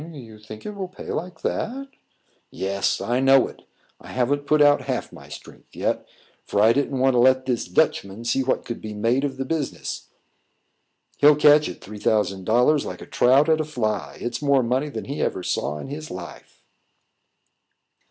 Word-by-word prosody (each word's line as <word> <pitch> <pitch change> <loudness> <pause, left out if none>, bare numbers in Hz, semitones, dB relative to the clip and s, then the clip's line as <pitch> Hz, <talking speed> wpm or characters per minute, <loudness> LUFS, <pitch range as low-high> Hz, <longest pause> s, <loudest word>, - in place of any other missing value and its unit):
"You 130 -9 -11
think 110 0 -11
it 210 - -4
will 195 -2 -5
pay 185 - -9
like 175 -1 -5
that?" 275 +4 -3 0.6
"Yes, 100 +1 -1
I 120 +2 0
know 135 0 +5
it. - - -13 0.4
I - - -14
haven't 140 +3 -1
put 155 +1 +3
out 145 -1 +5
half 130 -2 -3
my - - -13
strength - - -13
yet, - - -2 0.4
for 100 - -2
I 110 +2 +6
didn't 140 0 -1
want 130 +1 +3
to 125 - +3
let 130 +1 +4
this 125 -3 -1
Dutchman 95 +4 0
see 135 +3 +1
what 130 0 -1
could 120 - -6
be 105 -1 -7
made 115 +6 +1
of 135 -2 -2
the 135 - -3
business. 155 0 -4 1.1
He'll 150 +1 +6
catch 150 0 +5
at - - -9
three 105 +2 -10
thousand 100 -3 0
dollars 125 +6 +3
like - - -7
a - - -10
trout 135 +5 +3
at 160 -1 +3
a - - 0
fly; 110 - -3
it's 120 +2 -4
more 140 -3 +3
money 130 +5 0
than - - -6
he 140 +2 -4
ever 90 - -1
saw 75 - -2
in - - -7
his 155 +2 -7
life." 90 -1 -10
130 Hz, 190 wpm, -23 LUFS, 110-145 Hz, 1.1 s, I